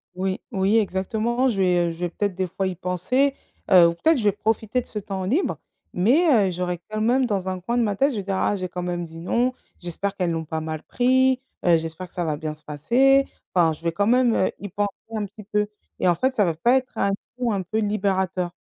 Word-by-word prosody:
Oui, 190 +1 -2
oui, 195 +3 +2
exactement, 220 +5 0
je 220 - -2
vais, 180 -2 +3
heu, - - -3
je 165 - -9
vais 175 0 -1
peut-être 200 +2 -2
des 185 0 -1
fois 190 +2 -3
y 185 - -3
penser, 185 +11 0 0.4
heu, 180 -3 +8
ou - - -2
peut-être 315 - +2
je 235 - -2
vais 205 - +4
profiter 220 +4 -1
de - - -16
ce 210 - -4
temps 195 -1 -5
libre 280 - 0 0.4
mais, 235 - +4
heu, - - -3
j'aurais 180 0 -3
quand 215 0 -3
même 250 +4 +3
dans 200 -5 -2
un 185 -1 -2
coin 235 +7 -2
de - - +3
ma 205 -2 0
tête, 275 +8 +2
je 240 - -4
vais 200 - -3
dire: 195 0 -2
«Ah, 205 - +1
j'ai 185 -2 -3
quand 180 0 -5
même 175 -1 -3
dit 165 0 -11
non, 240 +9 0 0.3
j'espère 185 +3 -4
qu'elles 180 -2 0
l'ont 165 -1 -2
pas 160 +1 -3
mal 155 -1 -5
pris. 260 +1 +2 0.3
Heu, 170 -2 +6
j'espère 165 +3 -6
que - - -29
ça 175 - -2
va 155 -2 -1
bien 155 0 -4
se 155 - -17
passer». 255 - +3 0.3
Enfin, 165 -3 +4
je 155 - -13
vais 170 - +1
quand 200 +4 +1
même, 245 +1 +3
heu, - - +2
y 205 - -6
penser 205 +2 -1 0.3
un 210 -1 -1
petit 210 +2 -12
peu 210 +1 0 0.3
et - - +2
en 175 - +5
fait, 260 +10 0
ça 210 -5 +2
va 170 - +1
pas 235 +11 +3
être 255 -1 -4
un 200 - +2 0.3
coup 245 -2 0
un 195 -3 -1
peu 215 +5 -2
libérateur. 190 -4 0
195 Hz, 255 wpm, -23 LUFS, 180-230 Hz, 0.4 s, heu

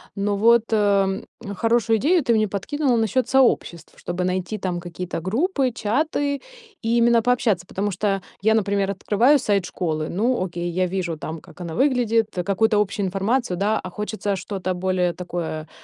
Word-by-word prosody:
но 200 +1 0
вот, 230 +1 +5
эм, 200 -2 +2 0.3
хорошую 230 +1 +2
идею 325 - +3
ты 235 - +2
мне 215 -1 +2
подкинула 250 +7 0
насчет 225 +3 +1
сообществ, 235 - +1
чтобы 175 +1 -3
найти 185 +3 -2
там 185 -3 -3
какие-то 175 0 -5
группы, 265 - 0
чаты 280 +5 -1 0.4
и 230 +1 +1
именно 235 0 +4
пообщаться. 225 -6 +1
Потому 205 +3 -2
что 195 +1 -1 0.2
я, 220 +2 +3
например, 200 -2 +1
открываю 240 +8 +3
сайт 200 -6 +1
школы- 155 -4 -3
ну, 230 +3 0
окей, 175 -1 -4
я 185 +2 0
вижу 175 -3 -3
там, 160 +1 -6
как 170 +1 -15
она 170 -2 -5
выглядит, 240 -4 +2 0.2
какую-то 210 +2 +2
общую 205 0 -2
информацию, 195 +3 0
да, 210 +3 +1
а 185 - -7
хочется 210 +1 -3
что-то 185 0 -3
более 180 -1 0
такое, 170 -3 -5
205 Hz, 165 wpm, -22 LUFS, 185-230 Hz, 0.4 s, вот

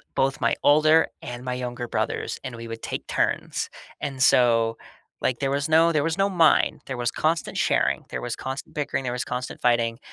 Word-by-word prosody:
both, 135 0 +1
my - - +2
older 155 +2 +5 0.2
and 120 0 -7
my 125 -1 -3
younger 120 -1 -4
brothers," - - -2
and 130 -2 -6
we 115 0 -8
would 115 0 -7
take - - -5
turns, - - -1 0.3
and, 135 -2 -4
so, 115 -3 +4 0.4
like, 125 -2 0
there 135 -1 0
was 140 +1 0
no 165 +1 +5
there 155 -3 +1
was 165 +1 -1
no 195 0 +2
"mine," 170 -4 +3
there 130 - -5
was 120 -1 -1
constant 160 +1 -1
sharing, - - +1
there - - -4
was 120 -1 -3
constant 135 +4 -6
bickering, 145 -3 -2
there 125 - -2
was 125 - -3
constant 125 0 -5
fighting, 115 -1 +2
130 Hz, 200 wpm, -24 LUFS, 120-155 Hz, 0.4 s, older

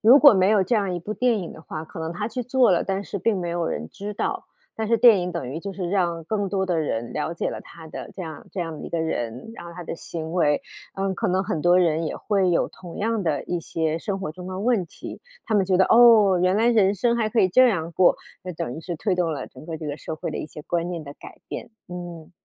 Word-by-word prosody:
如 240 +6 +8
果 285 -2 +9
没 190 -2 +4
有 210 -2 +4
这 215 - +1
样 200 -4 +1
一 - - -2
部 190 +5 -5
电 240 0 +2
影 180 -4 -6
的 - - -12
话， 160 -1 -6
可 160 - -9
能 160 0 -3
她 210 +4 -2
去 250 +2 -3
做 250 -1 +3
了， 175 - +2
但 195 +1 -2
是 200 - -4
并 210 +1 +1
没 175 -1 -3
有 170 -1 -1
人 75 - -3
知 205 +1 -6
道。 - - -2 0.3
但 220 -1 -2
是 230 - +4
电 225 -3 +7
影 180 0 -2
等 170 -7 -4
于 155 +5 -5
就 200 - -5
是 185 -2 -4
让 170 -4 0
更 205 +3 -1
多 190 0 0
的 175 -3 +1
人 120 -6 -2
了 155 +2 -2
解 - - -1
了 - - -6
她 165 -1 -13
的 155 - -8
这 190 - -6
样 160 -4 -8
这 - - -8
样 165 -3 -5
一 - - -6
个 170 - -1
人， 125 - -3
然 175 - -9
后 170 - -9
她 175 -1 -7
的 - - -4
行 160 -1 -6
为。 150 -5 +2 0.3
嗯， 195 0 -1
可 - - -1
能 185 +1 +1
很 185 -5 -2
多 175 +3 +5
人 165 -2 +2
也 - - -4
会 195 -3 +1
有 170 - +2
同 175 -2 -11
样 225 0 0
的 155 -5 -1
一 175 -1 -2
些 160 -1 -1
生 195 +3 -3
活 190 -5 -4
中 180 +2 -9
的 185 0 -5
问 220 -4 +1
题。 - - -9 0.2
他 220 - -1
们 195 -2 +3
觉 185 -1 +3
得， 190 - +5
哦， 225 -5 +7
原 185 +2 +3
来 230 +2 +3
人 205 -4 +4
生 235 +4 +2
还 230 -2 +1
可 225 - -1
以 190 - +6
这 255 +7 +6
样 170 -6 -1
过， 175 +2 +4 0.3
那 185 - -4
等 125 -6 -4
于 - - -7
是 170 +1 -5
推 185 +4 0
动 180 -2 0
了 150 - -4
整 130 +4 -14
个 165 -2 -4
这 155 -1 -7
个 145 0 -4
社 160 - -6
会 - - -4
的 - - -4
一 - - -4
些 150 - -10
观 170 +2 -1
念 170 -3 -5
的 140 - -8
改 - - -12
变， - - -6 0.2
嗯。 175 -2 -8
180 Hz, 305 characters per minute, -24 LUFS, 165-205 Hz, 0.3 s, 果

